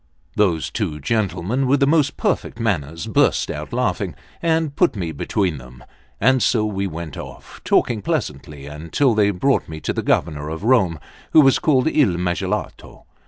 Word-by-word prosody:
Those 90 -7 +1
two 75 -1 -3
gentlemen, 105 - -1
with 140 +2 +3
the 140 - +4
most 145 -1 +2
perfect - - -1
manners, 85 -8 -2
burst - - +2
out - - -6
laughing, - - -1 0.3
and 160 -3 0
put 180 -5 +2
me 85 -5 -3
between 85 +1 -1
them; 65 0 -14 0.4
and 130 +3 +3
so 110 -3 +2
we 100 -2 -2
went 80 -3 -7
off, - - -10
talking 110 -3 +1
pleasantly, 75 - -4
until 80 - 0
they 105 -1 +3
brought 105 +6 0
me 80 0 -6
to - - -2
the - - -2
Governor 75 -2 0
of 80 +4 -6
Rome, 100 - +3 0.3
who 155 - +8
was 135 -2 +4
called 140 -2 +2
Il 130 - +2
Magalotto. 90 +3 -3
100 Hz, 165 wpm, -21 LUFS, 80-130 Hz, 0.4 s, who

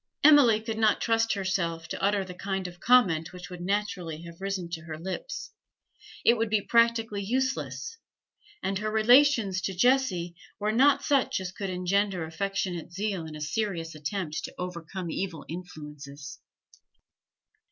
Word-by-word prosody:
Emily 285 -7 +7
could 220 0 -4
not 215 -1 +4
trust 225 -1 +2
herself 170 -4 -1
to - - -5
utter 200 -1 +2
the 180 - -8
kind 190 0 -3
of 175 0 -11
comment 185 -11 +4
which 180 0 -10
would 180 -1 -7
naturally 180 -4 -2
have 170 +1 -11
risen 195 -3 -2
to 165 -1 -4
her 155 -2 -6
lips; 190 - -5 0.7
it 235 - +7
would 225 0 0
be 215 0 +3
practically 230 -3 +3
useless, 265 - -2 0.6
and 195 0 -1
her 215 +1 -2
relations 220 -3 +4
to 190 - -3
Jessie 185 -7 +2 0.2
were 210 +1 0
not 270 +5 +4
such 275 -7 +2
as 185 -1 -5
could 195 0 -5
engender 185 0 0
affectionate 180 0 -3
zeal 195 -3 -3
in 155 - -8
a 150 - -8
serious 165 -1 -2
attempt 155 +1 -4
to - - -10
overcome 180 0 -5
evil 170 -6 -4
influences. 150 -5 -9
190 Hz, 150 wpm, -28 LUFS, 170-220 Hz, 0.7 s, Emily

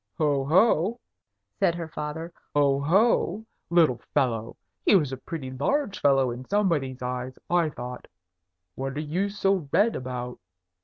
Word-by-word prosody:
"Ho! 145 -3 +2
ho!" 190 - +3 0.6
said 170 - +3
her 170 -2 -5
father. 160 +2 -5 0.2
"Ho! 140 -1 +3
ho! 205 +7 +2 0.2
Little 160 -8 +4 0.2
fellow! 115 -3 0 0.3
He - - +5
was 150 -8 +3
a 130 - -4
pretty 130 -1 -6
large 200 - -1
fellow 135 -3 +3
in 120 +2 -6
somebody's 150 -11 0
eyes, 125 +1 -4
I 175 -2 +3
thought. 125 -3 -8 0.7
What 135 +4 -4
are - - -1
you 170 +7 -1
so 195 -6 0
red 220 +3 +3
about? 125 -1 -5
150 Hz, 145 wpm, -26 LUFS, 130-180 Hz, 0.7 s, He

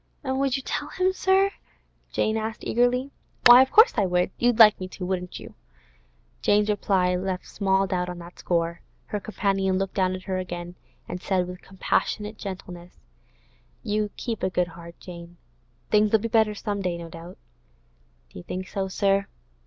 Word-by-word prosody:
'And 265 -1 -1
would 275 -1 +1
you 270 - -7
tell - - -3
him, 370 0 0
sir,' 380 +1 +3 0.6
Jane 220 - 0
asked 220 0 -4
eagerly. 250 +3 +1 0.3
'Why, 245 +1 +10
of 265 - +3
course 445 +3 +7
I 200 -3 +3
would. 180 +1 +1
You'd 240 -1 +2
like 215 -2 +8
me 185 - -5
to, 185 0 -7
wouldn't 180 -1 -3
you?' - - -11 0.9
Jane's 210 +1 +3
reply 190 -3 +1
left 185 0 -3
small 195 -1 +1
doubt 180 -1 -2
on 180 - -6
that 170 0 -12
score. 170 -1 -1 0.2
Her 210 - -3
companion 195 -2 0
looked 195 0 -2
down 185 -1 +1
at 185 - -9
her 185 -1 -2
again, 175 -1 -6 0.3
and 180 - -6
said 185 -2 0
with 180 0 -8
compassionate 210 +2 -2
gentleness: 180 -3 -8 0.9
'Keep 210 +2 -2
a 185 - +1
good 180 -1 0
heart, 170 0 -12
Jane. 175 -1 -11 0.5
Things'll 215 +1 +4
be 225 +2 -3
better 220 -1 +2
some 205 -1 -3
day, 180 -2 -2
no 170 -1 -7
doubt.' 170 +2 -11 0.9
'Do - - -10
you - - -10
think 185 - -5
so, 195 -1 -2
sir? 195 +1 +1
195 Hz, 175 wpm, -25 LUFS, 180-215 Hz, 0.9 s, Why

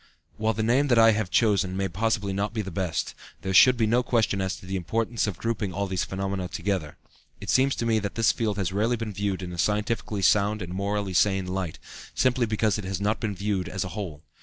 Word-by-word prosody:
While 110 0 0
the 110 - -1
name 130 +6 +3
that 120 -3 +3
I 115 0 +7
have 105 -3 -1
chosen 95 -4 +2
may 95 0 0
possibly 100 +2 -1
not 105 +3 -2
be 110 - -1
the 95 - -6
best, 85 -4 -2 0.3
there 95 - -2
should 125 +5 +7
be 115 - +2
no 120 +3 +3
question 115 -5 +1
as 95 0 -1
to - - -13
the 95 +1 -4
importance 110 +6 -1
of 100 -5 -3
grouping 110 -4 -2
all 100 0 -1
these 95 -2 -1
phenomena 95 -1 -3
together. 90 -4 -3 0.4
It - - -3
seems 135 +1 +3
to 115 - -2
me 115 -1 +2
that 100 -1 -4
this 115 -1 +4
field 105 -3 -2
has 95 -2 -1
rarely 110 +5 +1
been 115 -2 -5
viewed 100 -1 -2
in 90 0 -6
a 85 - -7
scientifically 105 0 -1
sound 105 +1 +3
and 90 0 -6
morally 100 0 -2
sane 95 +1 +2
light, 90 -3 -3 0.4
simply 125 -2 +2
because 110 -1 +1
it - - -5
has 95 0 -3
not 105 +2 0
been 105 -3 -2
viewed 100 -2 -2
as 95 +1 -2
a 90 - -5
whole. 85 -6 -6
100 Hz, 235 wpm, -26 LUFS, 95-110 Hz, 0.4 s, I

